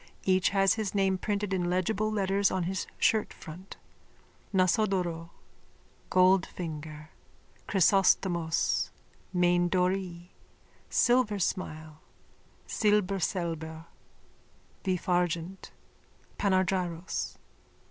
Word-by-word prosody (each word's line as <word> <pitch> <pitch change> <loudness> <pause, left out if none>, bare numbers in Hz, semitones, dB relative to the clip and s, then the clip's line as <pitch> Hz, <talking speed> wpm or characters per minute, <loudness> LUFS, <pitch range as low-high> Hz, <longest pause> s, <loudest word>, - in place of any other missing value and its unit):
Each 185 -1 +3
has 195 0 +3
his 215 -3 -3
name 190 -1 +2
printed 205 -1 -2
in 180 -2 0
legible 200 +4 0
letters 200 -1 +1
on 185 -1 -1
his 185 +2 -3
shirtfront: 190 -4 -1 0.8
Nasodoro, 185 -3 +1 0.8
Goldfinger, 160 -5 +1 0.6
Chrysostomos, 180 -3 +2 0.4
Maindorée, 180 0 +1 0.6
Silversmile, 185 -10 0 0.7
Silberselber, 175 -6 -1 1.0
Vifargent, 180 -1 -1 0.7
Panargyros. 185 -3 0
185 Hz, 65 wpm, -29 LUFS, 170-195 Hz, 1.0 s, Each